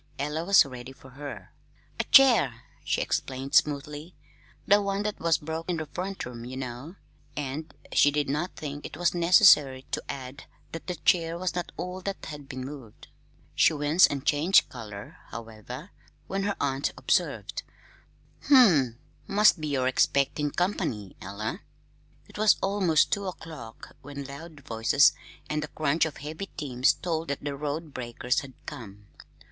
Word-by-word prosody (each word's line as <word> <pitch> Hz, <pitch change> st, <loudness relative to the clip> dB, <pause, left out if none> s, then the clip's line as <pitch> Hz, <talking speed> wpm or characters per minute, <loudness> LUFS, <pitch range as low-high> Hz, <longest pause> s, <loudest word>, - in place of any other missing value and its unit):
Ella 150 Hz, +3 st, -2 dB
was 195 Hz, -1 st, +6 dB
ready 125 Hz, -1 st, -9 dB
for 130 Hz, 0 st, -16 dB
her. 145 Hz, +2 st, -9 dB, 0.5 s
"A -, -, +2 dB
chair," 230 Hz, -, +5 dB, 0.2 s
she -, -, 0 dB
explained 135 Hz, +1 st, -3 dB
smoothly; 150 Hz, +3 st, +1 dB, 0.5 s
"the 205 Hz, +1 st, +5 dB
one 200 Hz, 0 st, -1 dB
that 210 Hz, 0 st, -3 dB
was 165 Hz, -2 st, +2 dB
broke 160 Hz, +3 st, -5 dB
in 175 Hz, -, 0 dB
the 155 Hz, -, -3 dB
front 185 Hz, +5 st, -5 dB
room, 120 Hz, -1 st, -8 dB
ye 125 Hz, +2 st, -7 dB
know." 130 Hz, +6 st, -6 dB, 0.4 s
And 145 Hz, +2 st, -4 dB, 0.2 s
she 145 Hz, -, +6 dB
did 145 Hz, 0 st, 0 dB
not 150 Hz, +6 st, -2 dB
think 145 Hz, -1 st, -6 dB
it -, -, -8 dB
was 175 Hz, 0 st, +1 dB
necessary 170 Hz, -7 st, +5 dB
to -, -, -1 dB
add 135 Hz, 0 st, -7 dB, 0.3 s
that 165 Hz, -, -8 dB
the 180 Hz, -, -2 dB
chair 165 Hz, 0 st, +2 dB
was 180 Hz, 0 st, -2 dB
not 175 Hz, -2 st, -4 dB
all 180 Hz, +2 st, -5 dB
that 195 Hz, +1 st, -5 dB
had 145 Hz, -3 st, -9 dB
been 130 Hz, -1 st, -5 dB
moved. 135 Hz, -6 st, -11 dB, 0.4 s
She -, -, +4 dB
winced 150 Hz, +4 st, +4 dB
and 140 Hz, 0 st, -4 dB
changed 155 Hz, +6 st, +4 dB
color, 105 Hz, -4 st, -9 dB
however, 115 Hz, -, -9 dB, 0.3 s
when 195 Hz, 0 st, -2 dB
her 200 Hz, -1 st, 0 dB
aunt 140 Hz, 0 st, 0 dB
observed: -, -, 0 dB, 0.9 s
"Humph! 175 Hz, -, +6 dB, 0.3 s
Must 205 Hz, -4 st, +4 dB
be 155 Hz, -, -2 dB
you're 135 Hz, -3 st, 0 dB
expectin' 140 Hz, +3 st, +2 dB
company, 160 Hz, -, -2 dB
Ella." 100 Hz, +4 st, -5 dB, 0.7 s
It -, -, -11 dB
was 215 Hz, -1 st, +5 dB
almost 190 Hz, -6 st, +2 dB
two 200 Hz, -1 st, -1 dB
o'clock 155 Hz, -11 st, -9 dB
when 140 Hz, 0 st, -7 dB
loud 145 Hz, +3 st, -10 dB
voices 115 Hz, +4 st, +4 dB, 0.3 s
and 150 Hz, 0 st, -1 dB
the 150 Hz, -, -4 dB
crunch 155 Hz, +1 st, +1 dB
of 160 Hz, -, -5 dB
heavy 155 Hz, +7 st, -6 dB
teams 130 Hz, -5 st, +1 dB
told 165 Hz, -2 st, -3 dB
that 140 Hz, 0 st, -4 dB
the 140 Hz, -1 st, -3 dB
road 150 Hz, +2 st, -4 dB
breakers 125 Hz, +1 st, -1 dB
had 135 Hz, -2 st, -10 dB
come. 105 Hz, -3 st, -9 dB
145 Hz, 160 wpm, -27 LUFS, 130-170 Hz, 0.9 s, was